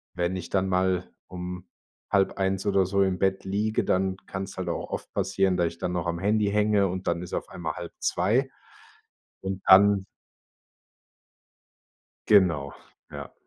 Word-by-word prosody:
wenn 90 +1 -1
ich 90 - -7
dann 95 0 0
mal 90 -1 0 0.2
um 90 0 -7 0.4
00:30 95 -1 +1
oder 95 -2 +3
so 100 +2 +1
im 95 -2 0
Bett 95 0 +1
liege, 105 +3 0
dann 95 0 +1
kann's 95 +1 -6
halt - - -3
auch - - -4
oft - - -5
passieren, 95 -2 +1
da 85 - +2
ich 85 0 -4
dann 90 - -3
noch 90 -1 -2
am 85 0 -2
Handy 105 +2 +1
hänge 105 -1 +3
und 95 +1 -5
dann 85 0 0
ist 90 - -8
auf - - -3
einmal - - -4
1:30 130 +6 -1 0.9
und 95 0 -4
dann 100 0 +6 2.2
Genau, 85 -9 +3 0.4
ja. - - -8
95 Hz, 150 wpm, -26 LUFS, 90-100 Hz, 2.2 s, dann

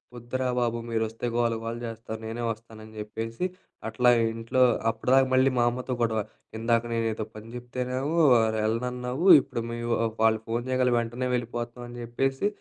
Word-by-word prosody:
వద్దురా 125 +2 -3
బాబు 120 -1 0
మీరోస్తే 115 0 -2
గోల 120 -1 +2
గోల 115 +1 -4
జేస్తారు 115 -1 -6
నేనే 115 +2 -4
వస్తాను 110 0 -7
అని 110 - -13
జెప్పేసి 115 +7 -4 0.4
అట్లా 125 +2 +3 0.2
ఇంట్లో 115 +3 -1 0.3
అప్పటిదాకా 130 +4 +3
మళ్ళీ 130 +1 +5
మా 120 - +4
అమ్మతో 125 +1 -4
గొడవ, 110 -2 +1 0.4
"ఇందాక 115 +1 +2
నేనెదో 115 -1 -1
పని 110 +1 -10
చెప్తేనే 125 +1 -4 0.6
వెళ్ళనన్నావు 125 - -1
ఇప్పుడు 115 - -5
మీ 115 - -4
వా - - +2 0.2
వాళ్ళు 110 0 +4
ఫోను 115 +1 -1
చేయగలినే 130 -1 +2
వెంటనే 120 +2 -2
వెళ్ళిపోతున్నావు" 120 0 -4
అని 120 - -9
చెప్పేసి 135 +8 0
120 Hz, 150 wpm, -27 LUFS, 115-125 Hz, 0.6 s, మళ్ళీ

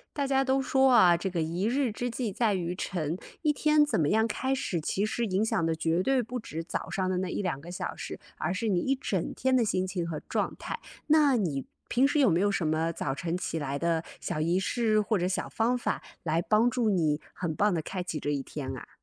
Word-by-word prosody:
大 280 -2 0
家 270 0 +3
都 265 0 +2
说 265 0 +3
啊， 180 -8 +7
这 190 +3 -3
个 175 -2 -1
一 170 +5 -1
日 255 -1 +1
之 245 +3 -3
计 230 -2 -3
在 220 0 +1
于 175 -1 -2
晨， 170 -3 -2 0.3
一 305 -2 +3
天 300 0 +4
怎 295 - 0
么 150 - +2
样 220 +4 +3
开 260 +4 -1
始 190 -10 -2
其 195 +6 0
实 235 +2 -1
影 200 0 +1
响 195 -6 0
的 165 0 0
绝 165 +2 +1
对 265 +3 +2
不 245 +2 -5
只 165 -6 -5
早 - - -4
上 190 -1 -1
的 185 -1 0
那 185 0 -1
1、2 180 -9 -2
个 170 +4 -10
小 180 - -4
时， - - -6 0.2
而 - - -1
是 220 +4 -1
你 185 -4 +2
一 270 +7 +1
整 190 -9 -2
天 260 +1 +1
的 245 - +3
心 185 -3 0
情 185 -2 -3
和 155 -2 -4
状 - - -1
态， - - -5 0.3
那 295 -4 +5
你 155 - -1 0.2
平 255 +3 +4
时 290 +2 +1
有 275 -4 +5
没 170 +1 +2
有 205 +1 +3
什 185 -4 0
么 160 +2 +1
早 140 -4 -2
晨 170 +4 -2
起 165 -2 -3
来 140 -2 -3
的 165 0 +1 0.2
小 155 - -3
仪 170 +4 +2
式 215 +2 +1
或 210 +1 +1
者 180 - 0
小 185 - -2
方 240 +3 +1
法 - - -2 0.2
来 165 +1 +1
帮 220 +5 +3
助 235 -2 +1
你 155 -5 +1
很 165 -3 -3
棒 205 +2 +2
地 170 - 0
开 180 +3 -4
启 165 -3 -4
这 145 - -2
一 140 -2 -1
天 135 -2 -5
啊？ - - -10
190 Hz, 265 characters per minute, -29 LUFS, 165-240 Hz, 0.3 s, 啊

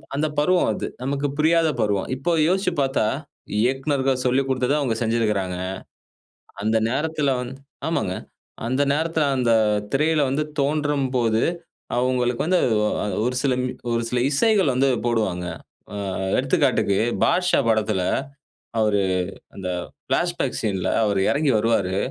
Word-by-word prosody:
அந்தப் 150 +1 -1
பருவம் 180 +4 +3
அது. - - -4 0.2
நமக்கு 140 +2 -1
புரியாத 160 +1 +3
பருவம். 100 -2 0
இப்ப 165 +6 0
யோசிச்சு 185 -1 +1
பார்த்தா 135 -4 +1 0.6
இயக்குனர்கள் 135 +1 +1
சொல்லிக் 130 +2 +2
குடுத்தத 130 +1 +1
அவங்க 130 -6 0
செஞ்சிருக்காங்க. 105 -5 0 1.0
அந்த 110 +2 +2
நேரத்தில 145 +1 0
வந் 125 0 -5 0.4
ஆமாங்க, 130 - -1 0.5
அந்த 130 +3 +1
நேரத்தில 160 0 0
அந்த 120 -2 +2 0.4
திரையில 155 +2 +2
வந்து 140 +3 0 0.2
தோன்றும்போது, 135 -6 +1 0.6
அவுங்களுக்கு 125 -1 +1
வந்து 180 +2 +3 0.4
அ - - -2 0.2
ஒரு 125 +1 -1
சில 135 -2 +2 0.4
ஒரு 115 0 0
சில 125 - 0
இசைகள் 195 0 +3
வந்து 135 +2 +2 0.2
போடுவாங்க. 105 -7 0 0.5
அ - - -4 0.4
எடுத்துக்காட்டுக்கு 100 -1 +2 0.3
பாட்ஷா 180 0 +3
படத்தில 110 -3 +1 0.8
அவரு 105 -2 +2 0.6
அந்த 95 -2 -5 0.4
பிளாஷ்பேக் - - 0
சீன்ல 95 -4 -1 0.2
அவரு 100 -2 +1
எறங்கி 145 0 +1
வருவாரு. 105 -4 +1
130 Hz, 120 wpm, -23 LUFS, 110-150 Hz, 1.0 s, பருவம்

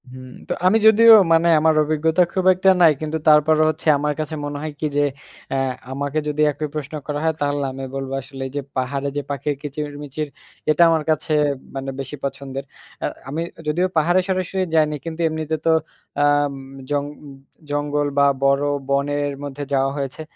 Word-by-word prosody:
হুম। 130 0 -11 0.2
তো - - -1
আমি 205 +4 +5
যদিও 225 +1 +7 0.2
মানে 165 +1 +4
আমার 160 +1 +3
অভিজ্ঞতা 155 +3 +1
খুব 185 -1 -1
একটা 185 +1 +2
নাই 165 -2 +8
কিন্তু 155 0 -2
তারপরও 155 +1 +5
হচ্ছে, 155 +1 -5
আমার 150 +1 -1
কাছে 155 0 -3
মনে 145 0 -4
হয় 155 0 -4
কি? - - -2
যে, 145 - +4 0.5
অ্যা 135 - -1 0.3
আমাকে 140 +2 -2
যদি 150 0 -1
একই 150 +1 -4
প্রশ্ন 150 -1 -5
করা 145 -1 -2
হয়, 160 0 +2
তাহলে 145 0 0
আমি 135 +1 -7
বলব 135 -1 -4
আসলে 135 +1 -10
এই - - -11
যে 145 - -1 0.2
পাহাড়ে 135 +2 -2
যে - - 0
পাখির 145 +1 -2
কিচিরমিচির, 145 0 -5 0.4
এটা 155 +2 +3
আমার 160 -2 +2
কাছে 155 0 0 0.4
মানে 135 0 -4
বেশি 135 +2 -5
পছন্দের। 135 0 -5 0.4
অ্যা - - -1 0.2
আমি 155 +4 -3 0.3
যদিও 175 +5 +1
পাহাড়ে 175 +4 +3
সরাসরি 185 0 -1
যাইনি 155 -1 +3
কিন্তু, 165 0 -5
এমনিতে 160 0 -2
তো - - +3 0.5
আম 145 -1 +3 0.4
জং 145 -1 0 0.6
জঙ্গল 145 0 -1
বা 140 - +5 0.2
বড় 140 +1 +3 0.3
বনের 145 +1 0
মধ্যে 145 0 -5
যাওয়া 135 0 +2
হয়েছে। 140 +1 -4
145 Hz, 175 wpm, -21 LUFS, 140-155 Hz, 0.6 s, নাই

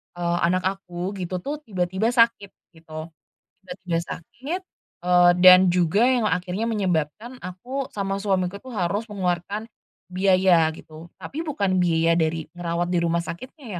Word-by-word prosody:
eee, 175 0 -1
anak 185 +1 0
aku 185 -1 -3
gitu 180 0 -4
tuh 295 +1 -4
tiba-tiba 190 -4 -2
sakit 230 -3 +3 0.2
gitu, 160 -1 -10 0.6
tiba-tiba 180 -2 -3
sakit, 275 - -6 0.4
eee, 180 0 +5
dan 185 0 +9
juga 180 +5 +2
yang 255 -3 +2
akhirnya 180 +3 -2
menyebabkan 200 - -2
aku 250 +10 -5
sama 195 -1 -2
suamiku 195 -1 -1
tuh 260 - -10
harus 200 +3 -1
mengeluarkan, 195 +2 -2 0.4
biaya 185 -3 +4
gitu. 160 +2 -13
Tapi 320 +4 -5
bukan 200 - 0
biaya 165 -1 +2
dari 160 -1 -1
ngerawat 175 0 -2
di 175 - +2
rumah 170 0 +1
sakitnya 255 - -9
185 Hz, 140 wpm, -24 LUFS, 175-210 Hz, 0.6 s, dan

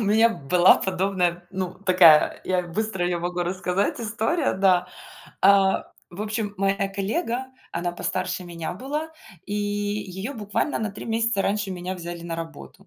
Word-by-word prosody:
У - - 0
меня 220 +3 +5 0.2
была 180 +1 +7
подобная, 185 -2 0
ну, 185 -1 -3
такая, 180 -5 +5
я 185 -1 +1
быстро 190 +1 -2
её 175 -1 -1
могу 175 +1 -2
рассказать 185 +4 -1
история, 230 +8 0
да. 185 -2 +3 0.5
А, 195 0 +4 0.2
в 180 +4 -6
общем, 215 -1 -3
моя 195 0 +1
коллега, 230 - -2 0.3
она 175 +1 -2
постарше 185 +1 -2
меня 170 -2 -5
была, 300 +4 -3 0.4
и - - -4
её 205 +2 -3
буквально 210 +6 -1
на 215 -1 -2
3 200 - -9
месяца 225 -3 +1
раньше 205 0 0
меня 180 0 -4
взяли 170 -1 -7
на 170 -1 -4
работу. 165 -2 -9
195 Hz, 155 wpm, -24 LUFS, 180-210 Hz, 0.5 s, была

